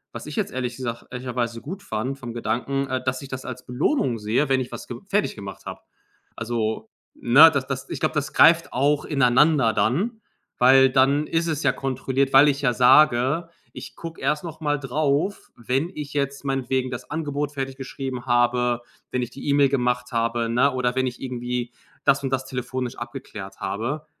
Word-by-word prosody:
was - - -6
ich - - -6
jetzt - - -1
ehrlich 125 -1 -3
gesagt 120 -2 -5
ehrlicherweise 125 -2 -3
gut 185 +7 -7
fand 125 +6 -4
vom 120 -3 -7
Gedanken, 135 +4 -2
äh, 130 -1 -2
dass 130 0 -2
ich 140 - -10
das 130 0 -6
als 125 0 -7
Belohnung 125 - 0
sehe, 115 +7 0
wenn 135 -1 +3
ich 125 - -5
was - - -8
ge 120 - -6
fertiggemacht 195 - -2
habe. - - -7 0.6
Also, 115 -1 -3 0.2
ne, 145 +7 +7
das 140 -3 -1
das 135 -1 -5
ich - - -5
glaube, 155 - +1
das 145 -2 -2
greift 165 0 +5
auch 145 +3 +1
ineinander 135 -1 +3
dann, 195 - 0 0.4
weil 130 +1 +6
dann 140 +3 +3
ist 165 +1 0
es 155 -2 -2
ja 140 - +4
kontrolliert, 135 +1 -1
weil 135 +2 +8
ich 140 0 -1
ja 125 -3 +2
sage, 130 +4 +4 0.3
ich - - -9
gucke 165 -1 -8
erst 150 +1 0
noch 160 -1 -8
mal 145 -1 +1
darauf, 145 +7 -1
wenn 130 +7 -1
ich 150 -1 -6
jetzt 140 0 -2
meinetwegen 130 -1 -1
das 125 - -7
Angebot 145 -1 -3
fertig 135 -1 -4
geschrieben 135 -1 -6
habe, 120 0 +2 0.3
wenn 125 -1 -1
ich 120 - -6
die 135 - -9
E-Mail 140 -1 +4
gemacht 125 -2 0
habe, 115 0 0
ne, 125 +5 +3
oder 125 -1 0
wenn 130 0 +1
ich 120 - -6
irgendwie 125 -1 -4 0.3
das 135 0 +3
und 135 - -1
das 130 0 -1
telefonisch 125 -1 -4
abgeklärt 120 -5 -8
habe. 120 +10 -3
130 Hz, 190 wpm, -23 LUFS, 120-145 Hz, 0.6 s, weil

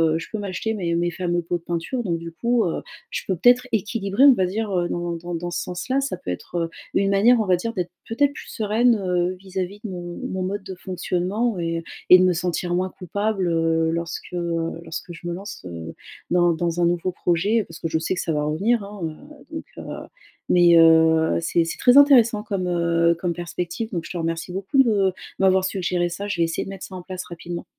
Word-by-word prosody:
heu - - +2
je 165 - -6
peux 220 - -2
m'acheter 205 +2 -3
mes 175 -5 -1
mes 175 0 0
fameux 175 -1 -1
pots 175 +1 -1
de 170 - -19
peinture 170 +10 -2
donc 170 -5 -1
du 165 0 -8
coup, 235 +6 +1
heu, 170 - -2 0.3
je - - -2
peux 190 - +1
peut-être 245 +6 +4
équilibrer 210 +1 0
on 280 - +9
va 190 -6 +1
dire, 210 +3 -2
heu, 175 -1 +1
dans 175 0 -2
dans 175 +1 -5
dans 175 +1 -4
ce - - -2
sens-là? 255 +10 -2
Ça 275 -7 -2
peut - - -8
être, 90 - -7
heu, 165 - -1 0.3
une 195 0 +3
manière 230 +5 +5
on 220 - +1
va 185 -2 +4
dire 230 +6 -3
d'être 180 -2 -3 0.2
peut-être 285 +5 +1
plus - - -10
sereine, 225 +2 +2
heu, 180 -2 0
vis-à-vis 190 +1 -5
de 220 - -4
mon 175 -2 -6
de - - -5
mon 190 0 -3
mode 195 +2 -3
de 190 -1 -7
fonctionnement 185 +4 -2
et 165 0 -2 0.3
et 180 - +11
de 185 - +4
me 185 - +4
sentir 175 0 -2
moins 185 +1 0
coupable, 195 +1 -2
heu, 165 0 +2
lorsque 170 +1 -4
lorsque 170 0 -3
je 170 +1 -9
me 175 - -2
lance, 195 +3 -7
heu, 85 -1 -7 0.4
dans 175 -1 +4
dans 170 +1 -2
un 170 - +4
nouveau 175 +1 0
projet. 190 +6 +1
Parce 165 - -11
que 165 - -2
je 160 0 0
sais 165 - -1
que - - -2
ça - - -2
va 150 -1 0
revenir, 200 +10 +1
hein, 200 0 -9
heu. 220 - -8
Donc, 315 - -5
heu - - -7 0.4
mais, 175 -1 +6
heu, 160 0 +5
c'est 170 0 +1
c'est 165 - -4
très 250 +2 +5
intéressant 235 -7 +6
comme, 195 -4 -2
heu, 170 -1 +2
comme 175 0 -1
perspective 175 +5 -4
donc 170 -2 -2
je - - -8
te 180 - -4
remercie 165 +1 -3
beaucoup 195 +7 -2
de 200 -6 +2 0.3
m'avoir 190 -1 +4
suggéré 180 -2 0
ça 200 +4 -5
je 200 -3 -2
vais 170 - +3
essayer 165 0 -1
de - - -8
mettre 195 -1 -7
ça 190 - -10
en 180 - -6
place 185 0 -6
rapidement. 170 0 -7
180 Hz, 235 wpm, -23 LUFS, 170-205 Hz, 0.4 s, et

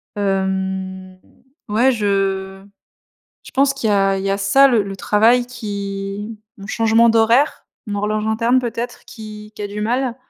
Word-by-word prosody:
Hem, 190 -1 -2 0.5
ouais, 235 +6 +3
je 195 -3 -1 0.8
je - - -13
pense 275 +1 +3
qu'il 235 -5 -2
y - - +3
a 195 -1 +2
il 190 - -4
y 195 - -1
a 195 - +1
ça, 235 +8 +5
le 235 -5 +3
le 195 0 -6
travail 225 +5 +3
qui 205 -2 -5 0.2
mon 200 0 -10
changement 225 +1 +3
d'horaire, 230 +6 +2 0.2
mon 205 -2 -3
horloge 215 +1 -1
interne 230 +3 +2
peut-être, 240 0 -5
qui 210 -2 -10
qui - - -8
a 205 - -3
du 210 +1 -6
mal. 245 +2 -1
210 Hz, 165 wpm, -19 LUFS, 195-230 Hz, 0.8 s, ça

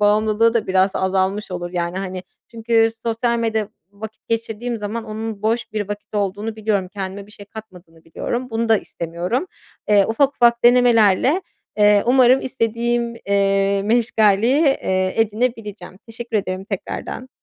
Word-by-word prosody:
bağımlılığı 215 +2 +3
da 230 - 0
biraz 190 +1 +3
azalmış 190 +2 -1
olur. 175 -1 -5
Yani, 175 +1 -2
hani, 185 -1 -5 0.3
çünkü 225 0 +2 0.2
sosyal 235 +1 0
medya 220 -2 -1 0.2
vakit 220 +2 -11
geçirdiğim 230 +1 -2
zaman 220 +2 -5
onun 215 -1 -6
boş 225 0 -1
bir 210 -2 -3
vakit 205 +1 -7
olduğunu 205 +2 -2
biliyorum, 205 -4 -1
kendime 195 +1 -6
bir 210 - -10
şey 205 -2 -12
katmadığını 180 -7 -13
biliyorum, 240 +9 -4
bunu 225 0 -1
da 225 - +5
istemiyorum. 175 - -4 0.4
Eee, 205 -2 +5
ufak 270 +5 +1
ufak 235 0 +3
denemelerle, 245 - +4 0.4
eee, 205 -1 +5
umarım 255 +1 +5
istediğim, 235 -1 -1
eee, 195 0 +2
meşgaleyi, 225 +3 +3
eee, 185 -9 +1
edinebileceğim. 215 -3 -2
Teşekkür 230 0 -4
ederim 190 -1 -3
tekrardan. 220 +5 -6
215 Hz, 140 wpm, -20 LUFS, 195-230 Hz, 0.4 s, da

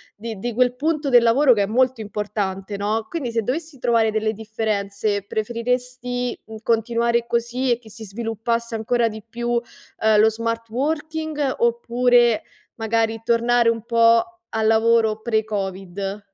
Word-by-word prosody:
di 220 -1 -7
di 240 +2 -3
quel 250 +1 +2
punto 300 -1 0
del 245 -2 +7
lavoro 255 +4 +4
che 205 -4 +4
è - - +1
molto 250 +3 +1
importante, 205 -2 -3
no, 215 +2 -1
quindi 260 -9 -4
se 230 - +1
dovessi 305 +5 -4
trovare 230 -2 +2
delle 215 0 0
differenze 210 -2 -2
preferiresti, 245 +2 -2
mhmm, 220 - -10
continuare 235 +1 +1
così 240 +2 0
e 235 - -4
che 220 -3 -16
si 220 +1 -10
sviluppasse 230 +2 -3
ancora 230 +1 +1
di 220 0 -8
più, 235 +1 -4
uhm, 225 -2 -1
lo 220 +1 +6
smart 230 +1 -3
working, 300 +2 -2
oppure 240 0 +3 0.3
magari 225 0 0
tornare 235 0 +3
un 230 -1 +1
po' 230 -1 +4 0.3
al 220 0 +1
lavoro 225 -1 +3
pre 220 -2 +1
Covid? 195 -1 -4
230 Hz, 150 wpm, -22 LUFS, 220-245 Hz, 0.3 s, del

